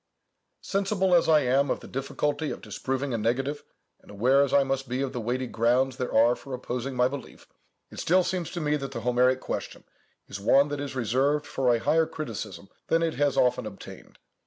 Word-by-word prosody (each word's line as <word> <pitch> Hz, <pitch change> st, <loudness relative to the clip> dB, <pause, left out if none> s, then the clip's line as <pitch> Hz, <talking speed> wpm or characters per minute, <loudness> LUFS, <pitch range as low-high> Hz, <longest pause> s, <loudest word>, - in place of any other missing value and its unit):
Sensible 195 Hz, -1 st, 0 dB
as 170 Hz, -1 st, +4 dB
I 155 Hz, -1 st, +6 dB
am 135 Hz, +2 st, +2 dB
of -, -, -1 dB
the -, -, -11 dB
difficulty 145 Hz, +3 st, -2 dB
of -, -, -5 dB
disproving 135 Hz, 0 st, -3 dB
a 115 Hz, -, -1 dB
negative, 135 Hz, +6 st, -1 dB, 0.4 s
and -, -, -22 dB
aware 125 Hz, +7 st, +3 dB
as 140 Hz, -2 st, +1 dB
I 140 Hz, -, +5 dB
must 135 Hz, -1 st, -2 dB
be 130 Hz, +2 st, -1 dB
of 135 Hz, -1 st, -4 dB
the 125 Hz, -, -3 dB
weighty 125 Hz, +3 st, -2 dB
grounds 125 Hz, +3 st, +1 dB
there 125 Hz, -2 st, -3 dB
are 115 Hz, +2 st, +4 dB
for 135 Hz, -2 st, -7 dB
opposing 125 Hz, +1 st, -4 dB
my 125 Hz, 0 st, +3 dB
belief, 135 Hz, -1 st, -9 dB, 0.4 s
it -, -, -9 dB
still 185 Hz, +2 st, +3 dB
seems 180 Hz, -2 st, -2 dB
to 175 Hz, -, -3 dB
me 150 Hz, 0 st, +1 dB
that 135 Hz, -1 st, -6 dB
the 115 Hz, -, -4 dB
Homeric 125 Hz, +2 st, +2 dB
question -, -, -5 dB, 0.4 s
is 100 Hz, -, -7 dB
one 135 Hz, +8 st, +4 dB
that 145 Hz, 0 st, -3 dB
is 140 Hz, -1 st, -5 dB
reserved 130 Hz, +5 st, +1 dB
for 130 Hz, -2 st, +1 dB
a 120 Hz, -, +3 dB
higher 160 Hz, +7 st, +2 dB
criticism 110 Hz, -, -6 dB, 0.2 s
than 165 Hz, 0 st, +2 dB
it 165 Hz, -1 st, 0 dB
has 145 Hz, 0 st, 0 dB
often 125 Hz, -2 st, +2 dB
obtained. 100 Hz, -2 st, -11 dB
135 Hz, 205 wpm, -27 LUFS, 125-145 Hz, 0.4 s, I